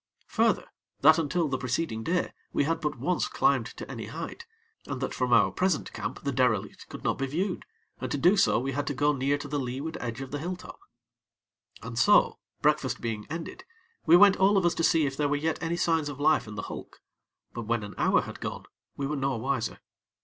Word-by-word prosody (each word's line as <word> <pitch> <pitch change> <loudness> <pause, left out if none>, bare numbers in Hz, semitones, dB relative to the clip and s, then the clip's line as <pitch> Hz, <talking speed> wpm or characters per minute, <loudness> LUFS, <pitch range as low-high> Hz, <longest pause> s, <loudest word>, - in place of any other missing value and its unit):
Further, - - +2 0.4
that, 155 +4 +7
until 165 +1 0
the 130 -2 -2
preceding 125 -2 -2
day, 180 +5 0 0.2
we - - +2
had 165 +3 -1
but 150 -3 -2
once 175 +9 0
climbed - - +2
to - - -9
any - - -6
height; - - -7 0.4
and - - -4
that - - -3
from - - -1
our - - +5
present 185 -3 0
camp 115 +4 -5
the 140 - 0
derelict 125 -6 0
could - - -9
not - - 0
be 135 - 0
viewed, 180 +7 -2 0.3
and 130 - -4
to - - 0
do 175 +8 +5
so, 195 - +4
we 135 +3 -1
had 140 +1 -2
to 145 - -2
go 145 +2 +3
near 140 +1 +1
to 145 0 -7
the 145 0 -2
leeward 135 +5 -4
edge 115 0 -4
of 135 -1 -7
the 145 - -3
hill 180 +4 -3
top. 180 - -12 1.0
And - - -4
so, - - +5 0.2
breakfast 150 -3 +2
being 110 -3 -4
ended, 165 - -6 0.4
we 170 +2 +8
went 200 0 +7
all 195 +2 +4
of 190 - +2
us 175 - +3
to 165 - -2
see 165 -2 +4
if 135 -1 -2
there 145 0 0
were 145 - +2
yet 155 +2 -1
any 165 +1 -1
signs 165 -4 +1
of 145 -1 -7
life 150 -4 +3
in 105 - -8
the 105 - -4
hulk; - - -8 0.5
but 120 -2 -6
when 115 -1 0
an 105 - -7
hour - - +3
had - - -8
gone, - - -5 0.3
we 140 - -2
were 150 +2 -2
no 135 -2 -1
wiser. 130 0 -2
145 Hz, 225 wpm, -28 LUFS, 130-165 Hz, 1.0 s, we